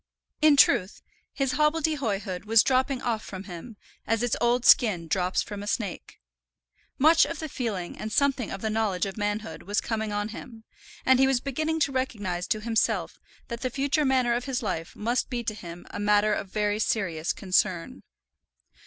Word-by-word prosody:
In 305 -2 +6
truth 220 -8 +3 0.3
his 270 -2 -1
hobbledehoyhood 280 - 0
was 220 0 +5
dropping 260 0 +1
off 225 -3 -1
from 190 -1 -8
him, 200 +4 -9 0.3
as 225 +1 +1
its 245 - +1
old 240 +1 +2
skin 180 -8 +5
drops 180 +2 0
from 205 -1 -7
a 205 - -7
snake. 205 -4 -4 0.8
Much 320 +4 +6
of 330 - -2
the 315 - -5
feeling 215 -11 -4
and 215 - -5
something 275 -3 +1
of 195 - -6
the 220 - -1
knowledge 210 -5 0
of 195 - -5
manhood 210 +1 -3
was 205 +1 -1
coming 220 -2 -3
on 205 +1 -2
him, 225 0 -10 0.4
and 260 0 +5
he 265 - +5
was 265 -2 +2
beginning 310 +5 -2
to 280 - +2
recognize 205 -9 -2
to 215 - -1
himself 225 0 0 0.3
that 235 -1 -6
the 255 - -1
future 280 +3 0
manner 260 -3 +2
of 240 +1 -2
his 265 -2 -2
life 175 -5 -4
must 235 +4 -1
be 245 -2 -3
to 215 - -2
him 175 -4 -10
a - - -6
matter 210 +1 +3
of 200 - -3
very 210 +1 0
serious 180 -7 -1
concern. 185 -3 0
220 Hz, 180 wpm, -26 LUFS, 205-260 Hz, 0.8 s, In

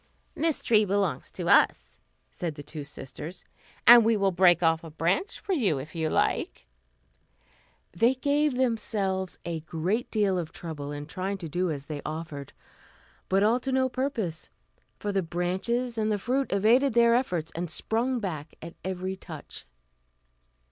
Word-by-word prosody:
"This 320 -2 0
tree 215 -2 +5
belongs 195 -7 -1
to - - -5
us," 60 - +3 0.3
said 165 -4 -4
the 145 - -8
two 150 +1 -7
sisters, 150 +4 -7 0.4
"and 240 0 +10
we 225 0 +3
will 195 -1 +2
break 180 -1 +4
off 165 0 +3
a 165 - -8
branch 170 - -1
for 390 - -2
you 210 - +2
if 140 +4 -7
you 160 -2 -1
like." - - 0 1.3
They 230 +9 +3
gave 285 +1 +1
themselves 210 -6 -1
a 170 -1 -3
great 170 +9 -2
deal 200 -4 +1
of 165 -3 -5
trouble 145 -4 -6
in 145 0 -5
trying 185 +5 -3
to 175 -3 -6
do 180 +4 -1
as 145 -3 -4
they 145 -1 -5
offered; 155 -3 -6 0.8
but 195 +1 +3
all 225 +4 +3
to 265 +2 -3
no 260 0 +2
purpose, 235 - -3 0.5
for 205 - -3
the 195 -1 +1
branches 190 +8 -2
and 215 0 +1
the 210 - +1
fruit 260 +6 -1
evaded 235 +6 +3
their 235 0 +6
efforts, 180 -10 0
and 170 +1 -4
sprung 235 +9 0
back 160 -7 -5
at 165 +1 -9
every 185 0 -3
touch. 165 -5 -10
190 Hz, 160 wpm, -27 LUFS, 165-235 Hz, 1.3 s, and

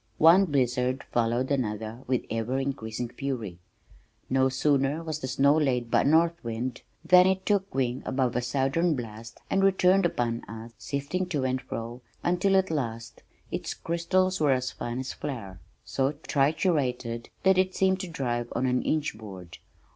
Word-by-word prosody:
One 170 +5 +7
blizzard 130 -3 0
followed 120 +3 +1
another 110 -3 -2
with 130 -1 0
ever 115 +3 -1
increasing 125 -4 -3
fury. 115 -10 -4 0.7
No 130 0 +3
sooner 140 +3 +1
was 155 -2 -4
the 130 - -4
snow 140 +3 +3
laid 125 -6 0
by - - +4
a - - -1
north 165 +3 +3
wind 120 +2 -4 0.2
than 180 +2 +7
it 190 0 0
took 200 -4 0
wing 130 -1 0
above 130 -3 0
a 125 - +1
southern 135 +7 +1
blast 115 -2 -8
and 195 - +2
returned 190 -1 +4
upon 120 -6 -2
us 115 +3 -9
sifting 140 +10 -2
to 150 -7 -1
and 130 0 0
fro 115 +2 -6 0.2
until 180 +3 +2
at 190 -2 +2
last 115 -6 -4 0.3
its - - -3
crystals 185 +3 0
were 145 -3 +4
as 130 0 -1
fine 120 +1 -5
as 130 0 -4
flour, 110 -10 -6 0.3
so 135 +1 0
triturated 135 -5 0 0.2
that 190 -1 +5
it 185 0 +1
seemed 190 0 +2
to 185 - -4
drive 120 -7 -2
through 120 - -3
an 125 0 +1
inch 155 -5 -1
board. 95 -6 -10
135 Hz, 165 wpm, -27 LUFS, 120-165 Hz, 0.7 s, One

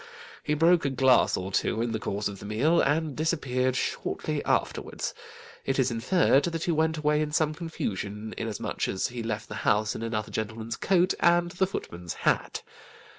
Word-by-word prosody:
He 150 - 0
broke 165 +2 +4
a 140 - +1
glass 130 -1 +4
or 95 +1 -4
two 110 - 0
in 115 0 0
the 110 - -2
course 100 0 -2
of 100 -1 -7
the - - -9
meal, 140 +11 +3
and 150 0 +1
disappeared 130 -5 0
shortly - - -2
afterwards; - - -1 0.5
it 135 - -1
is 130 -2 +2
inferred 135 +4 +3
that 165 -2 -2
he 175 - +1
went 160 0 +1
away 150 0 +2
in 150 -1 -2
some 155 0 +1
confusion, 110 - -4
inasmuch 110 -2 -3
as 95 - -1
he 120 -1 -5
left 110 -1 -3
the 105 - -7
house 105 +1 +2
in - - -6
another 110 -2 -3
gentleman's 110 +1 -4
coat, 185 -1 +2
and 175 0 +4
the 185 +2 +1
footman's 85 - -6
hat. - - +1
130 Hz, 180 wpm, -27 LUFS, 110-160 Hz, 0.5 s, broke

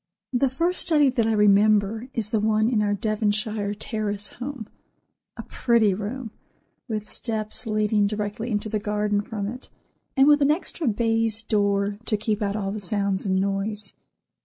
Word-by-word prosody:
The 255 +2 +2
first 335 +8 +1
study 295 -5 +5
that 230 -3 +1
I 225 - +2
remember 210 +2 +3
is 215 -2 -1
the 220 - +2
one 215 +1 +2
in 230 -3 +2
our 205 -1 +1
Devonshire 210 0 -1
Terrace 210 -3 -2
home, 250 -3 -7 0.7
a - - -6
pretty 230 -5 +2
room, 220 +4 -5 0.6
with 215 -1 -3
steps 220 0 -2
leading 215 -1 +2
directly 210 +2 -3
into 210 -1 -1
the 215 0 -1
garden 210 0 0
from 205 -1 -5
it, 250 +5 -6 0.5
and 270 +1 +6
with 295 0 +5
an 280 - +4
extra 320 -1 -1
baize 225 0 +1
door 200 -1 0
to 215 - +1
keep 215 +1 -2
out 200 -1 -1
all 205 0 -3
sounds 200 0 -1
and 190 0 +2
noise. 200 +1 -2
215 Hz, 160 wpm, -24 LUFS, 205-230 Hz, 0.7 s, and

